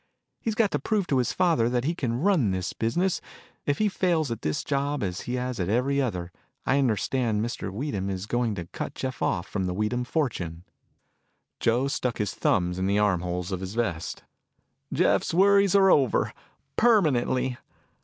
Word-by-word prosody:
He's 225 -2 -2
got 220 -3 +2
to - - 0
prove 210 -4 0
to 135 -6 +1
his 125 - +1
father 160 -10 +2
that 120 0 0
he 160 +5 0
can 125 -7 -2
run 175 - +3
this 95 -1 -2
business. 175 +12 0 0.5
If 145 0 +2
he 215 - +2
fails 170 -8 +1
at 115 - -4
this 75 - -1
job 140 -1 -1
as 90 -1 -3
he 125 - 0
has 125 -2 -3
at 90 0 -1
every 135 +5 +2
other, 90 -9 -3 0.3
I 135 - +3
understand 115 -2 +1
Mr. 120 -4 -4
Weedham 100 -4 -3
is 95 0 -3
going 120 -1 0
to 90 -3 -5
cut - - -6
Jeff 130 -2 -4
off 85 +1 0
from 95 -3 -2
the 90 0 -2
Weedham 105 +5 0
fortune." 100 - -2 1.0
Joe 120 +4 +2
stuck 125 -3 -1
his 105 -3 -1
thumbs 90 0 +1
in 95 - 0
the 100 +1 +2
arm 100 -4 +2
holes 90 +1 -3
of 95 - -2
his 95 +2 -6
vest. 100 -9 -2 0.7
"Jeff's - - +2
worries 200 +1 +5
are 195 -1 +6
over, 135 -5 +3 0.4
permanently. 130 - +3
120 Hz, 185 wpm, -26 LUFS, 100-145 Hz, 1.0 s, are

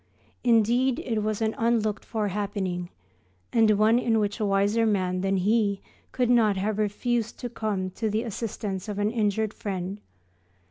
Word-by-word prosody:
Indeed, 240 +2 +3
it 225 -3 -2
was 215 +1 -1
an 220 0 0
unlooked 225 -3 +1
for 215 -3 -2
happening, 190 -3 -3 0.6
and 225 -2 +5
one 220 +3 +4
in 230 -2 +1
which 210 +1 -1
a 215 - 0
wiser 200 +3 +2
man 185 -4 +1
than 195 0 +1
he 200 +1 +2 0.3
could 245 -2 +1
not 220 -5 +4
have 210 +2 -1
refused 230 +2 -1
to 245 - -5
come 205 -5 -2
to 220 +4 -2
the 215 +2 0
assistance 210 -3 -4
of 205 - -4
an 205 +1 +1
injured 215 -1 0
friend. 195 0 -4
215 Hz, 165 wpm, -26 LUFS, 200-225 Hz, 0.6 s, and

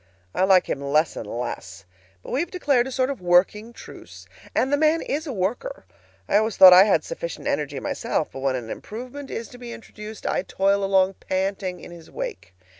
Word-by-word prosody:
I 185 - +2
like 190 -2 +5
him 140 - -3
less 150 +3 +1
and 110 - -6
less, 120 -3 -6 0.4
but - - -9
we 260 - 0
have 335 +1 -1
declared 280 -9 +1
a - - -6
sort 260 +1 0
of 270 - -7
working 185 +6 +2
truce. - - -12 0.3
And 265 +2 +1
the - - +7
man 310 +2 +2
IS 310 +3 -3
a - - -3
worker. 240 - -3 0.4
I 200 - +3
always 220 0 0
thought 185 -1 +11
I 185 +2 +9
had 210 - +2
sufficient - - -6
energy - - -2
myself, - - -2
but - - -8
when 135 -1 0
an 115 -3 -5
improvement 255 +5 -8
is 230 - -5
to 245 - -13
be 240 -1 -8
introduced, 220 -2 -10
I - - 0
toil 195 +1 +1
along 195 -1 +2
panting 190 -1 -2
in - - -11
his 170 -2 -13
wake. 485 - -7
210 Hz, 205 wpm, -24 LUFS, 185-265 Hz, 0.4 s, thought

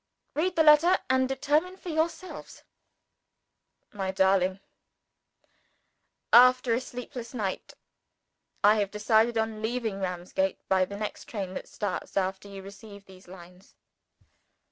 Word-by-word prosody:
Read 355 +4 -1
the 320 - +4
letter 315 +5 +6
and 260 0 +2
determine 300 +7 0
for 365 - -9
yourselves: 330 +3 -4 1.3
"MY 195 -2 -3
DARLING, 190 0 +2 1.7
After 255 0 +6
a 235 - 0
sleepless 250 -1 -8
night, 200 -5 -4 0.9
I 210 +2 +6
have 205 -2 0
decided 220 +3 +2
on 220 -1 -2
leaving 220 -3 -2
Ramsgate, 185 +1 -3
by 190 -1 +3
the 200 +2 -8
next 210 0 -5
train 195 -4 -5
that - - -7
starts 205 -1 -5
after 190 +1 -1
you 195 -1 -9
receive 200 0 -12
these 190 -1 -16
lines. 180 +1 -15
215 Hz, 120 wpm, -27 LUFS, 190-255 Hz, 1.7 s, letter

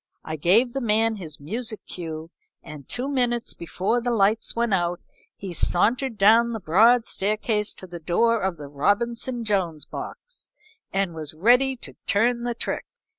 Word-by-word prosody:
I 155 - -4
gave 210 - +3
the 270 - -2
man 225 -1 +2
his 160 -6 -6
music 215 - -4
cue, 160 -2 -7 0.3
and 150 -3 -11
two 250 +2 -1
minutes 245 -3 0
before 190 +7 -1
the 245 - -1
lights 215 -1 +2
went 235 -2 +1
out 175 -1 0 0.4
he 190 -3 -7
sauntered 230 - +1
down 225 +4 +5
the 225 - -3
broad 225 +7 +4
staircase 210 +1 -1
to - - -9
the 175 -1 -8
door 225 +8 +2
of 190 -2 -1
the 145 -1 -8
Robinson 235 - -1
Jones 180 -7 -1
box, - - -9 0.4
and 195 -3 0
was 155 -2 -6
ready 250 +9 +4
to 240 - -10
turn 235 +4 +2
the 240 -1 -2
trick. - - -3
210 Hz, 165 wpm, -24 LUFS, 175-235 Hz, 0.4 s, down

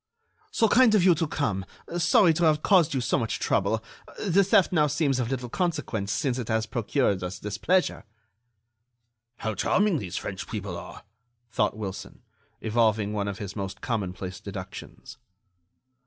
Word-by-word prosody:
"So 225 - +2
kind 230 0 +5
of 200 - +4
you 180 -1 +6
to 165 0 -1
come! 105 -11 -1 0.4
Sorry 170 +1 +5
to 170 +2 +1
have 155 -1 +3
caused 170 -6 +4
you 130 - 0
so 120 - +1
much 115 -2 -2
trouble! 110 +2 0 0.3
The 195 -1 +3
theft 190 -1 +4
now 155 -4 +3
seems 145 -2 +1
of 120 -2 -1
little 125 -2 -3
consequence, 115 - -2
since 130 +2 -1
it 120 - -4
has 110 -1 0
procured 110 -3 0
us 90 +2 -4
this 105 -1 -6
pleasure." 185 +1 +1 1.3
"How 110 -1 -3
charming 190 - +2
these 90 -6 -5
French - - -5
people - - -5
are!" - - -9 0.5
thought 105 -1 0
Wilson, 100 -4 -7 0.4
evolving 110 -2 +1
one 100 -1 -1
of 100 -1 -4
his 100 -2 -6 0.3
commonplace 95 -5 -3
deductions. 100 +5 -9
120 Hz, 155 wpm, -26 LUFS, 105-165 Hz, 1.3 s, you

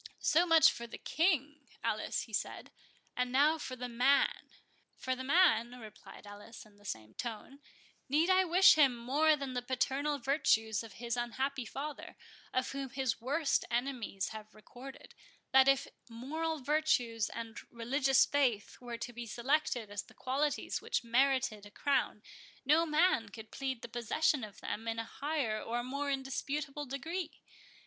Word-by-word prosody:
"So 345 +3 +3
much 325 -1 +7
for 235 - -7
the - - -8
King, 300 -4 0 0.2
Alice," - - -1
he - - -14
said, - - -3 0.4
"and 250 0 -1
now 295 +5 +4
for 255 - -5
the 250 0 -5
Man." 250 +4 +2 0.5
"For 260 0 -2
the 260 - -6
man," 250 -6 +3
replied 215 -2 -12
Alice, 205 +3 -11
in 210 -1 -21
the 205 - -21
same 110 - -6
tone, 240 +3 -7 0.5
"need 305 +5 +3
I 375 0 +5
wish 365 +2 +7
him 275 -6 +4
more 290 +6 +3
than 275 -3 -5
the 250 - -1
paternal 270 +3 -1
virtues 225 -5 +1
of 225 -3 -10
his 235 0 -3
unhappy 245 +1 -2
father, 290 +4 -7 0.3
of 255 0 -1
whom 275 -1 -4
his 260 -3 -2
worst 285 +4 +1
enemies 240 -5 -2
have 215 0 -10
recorded, 250 +5 -12 0.4
that 265 0 +6
if 275 0 +4 0.2
moral 305 +7 -3
virtues 250 -7 +1
and 230 -1 -7
religious 265 +3 +3
faith 250 -8 0
were 240 -1 -6
to 245 +1 -6
be 235 0 -7
selected 245 -2 0
as 205 -1 -3
the - - -19
qualities 285 +3 -1
which - - -1
merited 255 -2 +1
a - - -14
crown, 260 -2 0 0.4
no 320 +4 +4
man 300 - +2
could 220 +1 -11
plead 265 -3 -4
the - - -5
possession 240 +4 0
of 210 -1 -9
them 225 +2 -5
in 225 0 -2
a 225 - -2
higher 270 -4 -2
or 240 +1 -3
more 280 +3 -3
indisputable 275 +2 -3
degree. 320 +6 -5
260 Hz, 160 wpm, -33 LUFS, 230-290 Hz, 0.5 s, much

